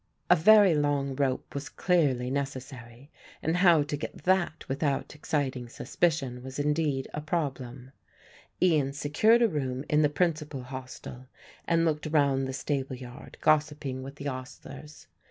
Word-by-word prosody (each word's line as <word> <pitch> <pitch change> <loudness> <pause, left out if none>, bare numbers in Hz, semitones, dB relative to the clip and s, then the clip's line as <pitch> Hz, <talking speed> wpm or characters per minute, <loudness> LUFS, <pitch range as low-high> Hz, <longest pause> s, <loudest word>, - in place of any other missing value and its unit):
A - - +9
very 200 +2 +6
long 145 -2 0
rope 135 -2 -1
was 140 0 -5
clearly 140 -9 +1
necessary 130 -1 -6 0.3
and 165 +2 +1
how 175 -4 +5
to 145 - -3
get 145 - -7
that 185 -3 +1
without 140 +1 -1
exciting 135 -5 -2
suspicion 135 -3 -1
was 130 +1 -8
indeed 145 -2 0
a 150 - -3
problem. 135 -5 -4 0.7
Ian 150 -7 +2
secured 185 +12 +3
a - - +5
room 135 -6 -3
in 150 0 +3
the 150 - +4
principal 150 -4 -1
hostel 130 0 -9 0.4
and 165 0 +3
looked 155 -1 -1
round 140 -3 +2
the - - -3
stable 135 -1 -2
yard, 125 +2 -11
gossiping 150 -4 +1
with 135 +1 -8
the 140 - -9
ostlers. 140 +3 -8
145 Hz, 145 wpm, -28 LUFS, 130-155 Hz, 0.7 s, A